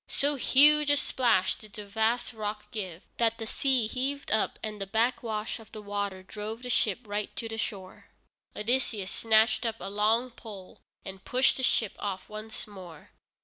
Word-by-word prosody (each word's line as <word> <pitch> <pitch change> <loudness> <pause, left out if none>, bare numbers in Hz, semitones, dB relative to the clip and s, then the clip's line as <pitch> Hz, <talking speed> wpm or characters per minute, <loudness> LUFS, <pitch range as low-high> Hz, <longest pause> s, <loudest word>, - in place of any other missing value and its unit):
So 285 +1 +1
huge 290 +2 +6
a 290 - +5
splash 230 -10 +2
did 215 -1 -12
the 210 - -7
vast 220 +4 0
rock 210 -1 -5
give, 185 -6 -5
that 230 -1 +2
the 225 - -4
sea 255 0 +2
heaved 270 +5 -2
up 220 0 +1
and 210 -2 -4
the 195 - -3
backwash 225 0 0
of 225 - -15
the 215 - -7
water 200 -2 -3
drove 215 +4 -6
the 250 - -3
ship 220 0 +1
right 210 -1 -3
to 230 - -4
the 225 0 -5
shore. 190 -3 -5 0.5
Odysseus 215 -3 0
snatched 220 +1 +3
up 225 -2 -1
a 195 +2 -5
long 220 +5 +2
pole 205 -5 -11 0.3
and 190 0 -8
pushed 255 +1 +3
the - - -2
ship 225 -4 +2
off 195 -2 -4
once 215 +1 -7
more. 185 -7 -12
220 Hz, 180 wpm, -29 LUFS, 205-240 Hz, 0.5 s, huge